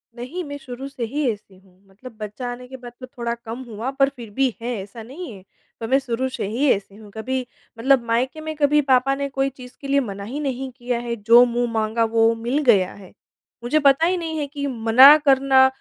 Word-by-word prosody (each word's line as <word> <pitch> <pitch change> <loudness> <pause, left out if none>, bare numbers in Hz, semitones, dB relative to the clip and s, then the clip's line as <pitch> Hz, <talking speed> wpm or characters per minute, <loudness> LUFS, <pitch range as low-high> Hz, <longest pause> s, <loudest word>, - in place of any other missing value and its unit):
नहीं 255 +10 -6
मैं 285 -1 -7
शुरू 265 0 -8
से 260 -4 -6
ही 285 +4 -2
ऐसी 205 -2 -12
हूँ, 185 0 -25
मतलब 220 +4 -14
बच्चा 215 +4 -6
आने 250 +1 -9
के 260 - -9
बाद 245 -1 -10
तो 255 - -7
थोड़ा 240 -3 -4
कम 235 +2 -8
हुआ 225 +3 -5
पर 275 0 +2
फिर 235 -4 -10
भी 265 +4 +1
है 240 +1 -3
ऐसा 215 +3 -10
नहीं 280 +5 -8
है। 190 - -14 0.4
तो 225 - -4
मैं 270 +3 +3
शुरू 255 0 -2
से 255 - -4
ही 265 +6 +1
ऐसी 195 0 -2
हूँ, 210 0 -14
कभी 255 +4 -3 0.3
मतलब 260 0 +3
मायके 250 +6 -1
में 315 0 -5
कभी 295 0 +3
पापा 265 0 +2
ने 280 0 -3
कोई 270 0 -1
चीज़ 250 -1 -13
के 275 - -7
लिए 280 0 +3
मना 200 -5 -5
ही 255 +8 -5
नहीं 265 -2 -3
किया 245 -1 -2
है, 235 -1 -4
जो 235 +3 +6
मुँह 240 0 -1
माँगा 225 +1 0
वो 225 0 +3
मिल 235 +4 -2
गया 200 -8 +3
है। 195 -3 -14 0.5
मुझे 280 +6 +2
पता 280 +3 +4
ही 365 +1 +1
नहीं 325 -2 -4
है 290 - -2
कि 285 0 -5
मना 255 +4 +7
करना 270 -1 +5
250 Hz, 230 wpm, -22 LUFS, 230-275 Hz, 0.5 s, मना